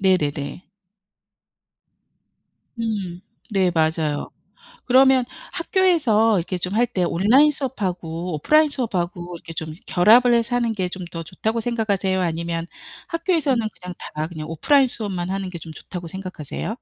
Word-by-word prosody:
네네네. 155 -4 0 2.2
음 200 -6 -3 0.3
네 190 -3 +2
맞아요. 160 -2 0 0.6
그러면 260 0 +5 0.3
학교에서 305 - +3
이렇게 180 +2 -3
좀 180 +2 -3
할 240 +3 +3
때 190 -7 -1
온라인 225 - +4
수업하고 180 - -3
오프라인 305 - +4
수업하고 180 -9 -3
이렇게 165 0 -10
좀 160 -1 -5
결합을 230 +7 +5
해서 235 +1 +1
하는 235 -2 +1
게 190 -4 -1
좀 185 0 -7
더 165 - -5
좋다고 215 +7 -2
생각하세요? 205 -5 0
아니면 170 -1 -2 0.4
학교에서는 320 - +1
그냥 180 0 -6
다 155 +1 -4
그냥 155 -2 -7
오프라인 270 - +3
수업만 195 -7 -2
하는 195 0 -2
게 180 - -7
좀 160 - -9
좋다고 175 +1 -8
생각하세요? 185 -4 -6
190 Hz, 320 characters per minute, -22 LUFS, 175-240 Hz, 2.2 s, 그러면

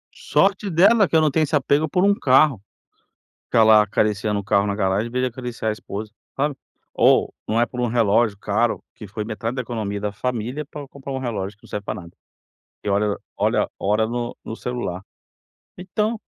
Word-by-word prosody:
Sorte 200 +1 +1
dela 195 +4 +5
que - - -2
eu 160 - +6
não 155 - +3
tenho 155 +3 +2
esse 155 +1 0
apego 145 +2 +2
por 180 - +1
um 200 +1 +5
carro. 135 - +4 0.8
Ficar 115 - +4
lá 110 -1 +7
acariciando 105 0 0
um - - -6
carro 100 +1 +2
na 100 -1 -1
garagem 100 +2 0
em - - -10
vez 125 +1 0
de - - +2
acariciar 120 -3 -4
a - - 0
esposa, 105 0 -7 0.3
sabe. 145 +1 0 0.4
Ou, - - +4
não 110 +2 +1
é 120 - +4
por 125 +1 -5
um 120 - +1
relógio 115 -2 +2
caro, 110 +4 0
que 110 - -9
foi 105 +2 -5
metade 115 +2 -4
da 130 - -1
economia 110 -4 -4
da 105 0 -2
família 125 +5 -3
para 145 0 -9
comprar 140 0 -9
um 135 - -2
relógio 105 -5 -4
que - - -39
não - - -17
serve 105 - -4
para 105 -1 -4
nada, 85 -1 -13 0.7
que - - -4
olha 100 +1 +1 0.2
olha - - +1
hora 105 +2 +1
no 120 +1 -4
no 110 - -5
celular. 115 -7 -4 0.7
Então 210 +5 -2
115 Hz, 205 wpm, -22 LUFS, 105-140 Hz, 0.8 s, lá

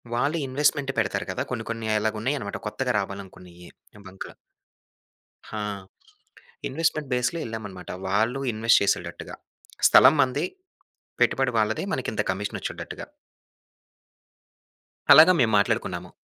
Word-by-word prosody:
వాళ్ళు 145 +7 0
ఇన్వెస్ట్‌మెంట్ 140 +1 +1
పెడతారు 100 -2 -1
కదా! - - -3
కొన్ని 115 -3 -3
కొన్ని 115 -1 -5
అలాగా 110 0 -1
ఉన్నాయన్నమాట. 130 -5 -2
కొత్తగా 125 +3 -2
రావాలనుకున్నయి 90 -3 -10 0.4
బంక్‌లు. 95 0 -9 1.2
హా! 105 -1 -4 1.0
ఇన్వెస్ట్‌మెంట్ 155 0 -1
బేస్‌లో 125 +7 0
వెళ్ళామన్నమాట. 105 -5 -7 0.2
వాళ్ళు 110 +7 +1
ఇన్వెస్ట్ 115 +2 +4
చేసేటట్టుగా 85 -3 -2 0.5
స్థలం 150 - +7
మనది, 130 -2 0 0.8
పెట్టుబడి 135 -2 +2
వాళ్ళది, 110 - 0
మనకి 130 - -2
ఇంత - - 0
కమిషన్ 100 +2 -4
వచ్చేటట్టుగా. - - -6 2.1
అలాగా 160 +5 +9
మేము 115 -3 +3
మాట్లాడుకున్నాము. 95 -5 -1
110 Hz, 105 wpm, -25 LUFS, 100-130 Hz, 2.1 s, అలాగా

